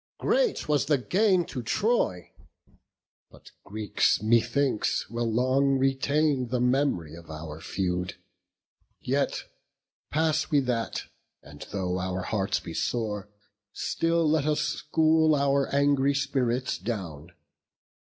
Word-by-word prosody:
Great - - +1
was 145 -2 +1
the 145 -2 +3
gain 185 - +2
to 130 - -5
Troy; 115 - 0 1.0
but - - -17
Greeks, 105 -1 +1
methinks, 120 +3 +1
Will 115 -1 -1
long 130 +4 +2
retain 135 0 +1
the 125 +1 -1
mem'ry 125 - +1
of 85 -1 -12
our 80 0 -7
feud. 90 0 -2 0.8
Yet - - -1 0.7
pass 155 0 +1
we 145 - +4
that; 120 -3 -2 0.4
and 75 0 -11
though 90 -2 -2
our 90 0 -3
hearts 95 -1 -1
be 85 - -8
sore, 105 -1 -2 0.4
Still 165 -1 0
let 150 -1 +2
us 150 -1 +1
school 155 +1 +2
our 140 -1 +1
angry 140 0 +2
spirits 130 -2 -1
down. 85 -7 -5
130 Hz, 115 wpm, -27 LUFS, 100-145 Hz, 1.0 s, we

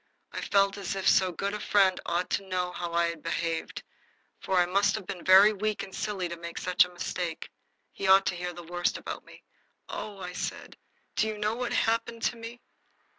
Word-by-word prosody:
I - - -5
felt 200 0 +2
as 195 0 -3
if 195 0 -2
so 185 -1 +5
good 200 +4 -3
a 210 - -3
friend 195 -3 +3
ought 175 +1 -1
to 195 - -1
know 180 -1 -1
how 175 -1 -5
I 170 0 +2
had 165 -2 -7
behaved 165 0 -3 0.6
for 190 - -1
I 175 - +5
must 200 +3 +2
have 215 -3 -5
been 180 -1 -6
very 195 +3 +8
weak 215 +1 -2
and 190 - -10
silly 205 -4 -2
to 170 - -5
make 170 0 -8
such 180 -1 +4
a 180 - -7
mistake. 175 -1 -4 0.4
He 195 - -4
ought 190 0 +7
to 185 - 0
hear 180 0 -4
the 175 0 -10
worst 175 +1 -1
about - - -6
me. - - -15 0.4
"Oh," 210 -2 -6
I 180 -1 -6
said, - - -5 0.4
"do 220 - +2
you 215 -1 -3
know 210 +1 0
what 245 +1 -3
happened 230 0 0
to - - +1
me?" 230 +1 -9
190 Hz, 215 wpm, -28 LUFS, 175-210 Hz, 0.6 s, very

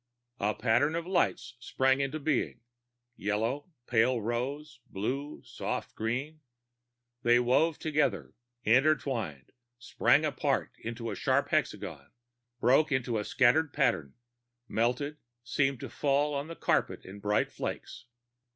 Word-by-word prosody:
A 105 +1 0
pattern 125 +7 +2
of 170 0 -2
lights 180 -7 0
sprang 130 +2 +1
into 140 +3 -2
being 145 -2 -1 0.6
yellow, 115 - -1 0.2
pale 120 +1 +3
rose, 120 +5 -3
blue, 135 +9 -4
soft - - -4
green. 135 +8 -3 0.8
They 120 0 +5
wove 140 +6 +3
together, 145 -9 0 0.3
intertwined, 120 - +1 0.3
sprang 120 +4 +2
apart 145 -2 0
into 115 0 -5
a - - -4
sharp - - +1
hexagon, - - -2 0.5
broke 135 +7 +4
into 125 -4 0
a - - -2
scatter 130 +8 +4
pattern, 120 - 0 0.5
melted, 135 +6 0 0.3
seemed 135 +2 0
to - - -6
fall 145 0 +1
to 145 - -9
the 165 - -7
carpet - - 0
in 100 +2 -9
bright 105 +1 +1
flakes. 120 - -6
130 Hz, 125 wpm, -30 LUFS, 115-145 Hz, 0.8 s, They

